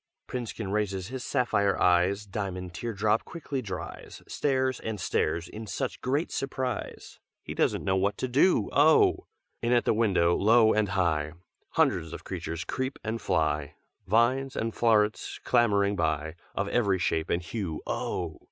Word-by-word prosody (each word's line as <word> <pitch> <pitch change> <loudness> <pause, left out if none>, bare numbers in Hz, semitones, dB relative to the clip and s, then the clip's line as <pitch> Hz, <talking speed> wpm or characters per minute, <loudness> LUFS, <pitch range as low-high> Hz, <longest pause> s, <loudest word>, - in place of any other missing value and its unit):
"Princekin 115 -5 -4
raises 100 -2 -1
his 130 0 -5
sapphire 100 -7 +1
eyes, 90 +4 +3
Diamond 95 -3 -5
tear 115 +7 -4
drop 105 +1 +1
quickly 145 -5 -5
dries, 90 -6 -7
Stares 130 -2 0
and 110 -2 -4
stares 85 -2 0
in 110 +1 -8
such - - -3
great 140 +6 0
surprise 130 -2 -4 0.2
He - - -6
doesn't - - +1
know 95 - +1
what 100 +2 0
to 130 - -2
do, 130 - +3
oh! 155 +3 +4 0.3
In 120 +1 +1
at 120 - +3
the - - +3
window, 95 -6 +3
low 110 +2 +5
and 105 -2 +1
high, 80 -6 0 0.4
Hundreds - - +1
of - - -7
creatures 85 +1 -4
creep 130 +1 -3
and 115 +1 -3
fly, 75 -5 0 0.3
Vines 130 +6 +2
and 115 0 -2
flowerets 110 -2 +1
clambering 100 -4 +3
by, 80 -2 -1 0.2
Of 100 - -1
every 100 -5 +2
shape 80 -3 -1
and 85 0 0
hue, 90 -5 -4
oh! - - -3
105 Hz, 155 wpm, -28 LUFS, 90-120 Hz, 0.4 s, low